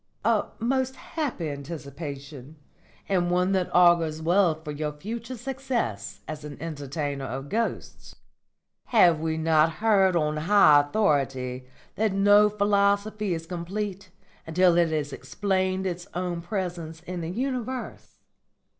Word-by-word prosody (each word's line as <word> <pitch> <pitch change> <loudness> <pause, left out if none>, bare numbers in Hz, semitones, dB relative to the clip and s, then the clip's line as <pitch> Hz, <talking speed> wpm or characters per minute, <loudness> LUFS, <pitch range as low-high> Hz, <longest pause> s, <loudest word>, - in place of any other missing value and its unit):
"A - - +3
most 260 +2 0
happy 285 - -4
anticipation, 140 -1 -8 0.5
and 180 -3 +1
one 180 +2 +2
that 185 -2 +1
augurs 170 -3 +4
well 170 +1 +3
for 155 -1 -8
your 150 0 -3
future 230 +10 -6
success 235 - -3
as 155 -1 -6
an 150 -2 -8
entertainer 145 -3 -4
of 135 +3 -5
ghosts. 230 +1 -3 0.7
Have 175 -9 +5
we 160 0 -1
not 160 0 +3
heard 195 -3 +3
on 155 -2 +1
high 155 -3 +6
authority 135 -7 0 0.3
that 215 -2 +1
no 205 +1 +5
philosophy 205 -1 +1
is 165 0 -6
complete 185 +3 -5 0.4
until 175 +1 +4
it 170 -1 +3
has 150 -3 -2
explained 190 -1 -1
its 180 0 -4
own 175 -1 -2
presence 170 -4 -4
in 180 0 -5
the 165 - -4
universe? 255 +3 -4
175 Hz, 130 wpm, -26 LUFS, 155-205 Hz, 0.7 s, high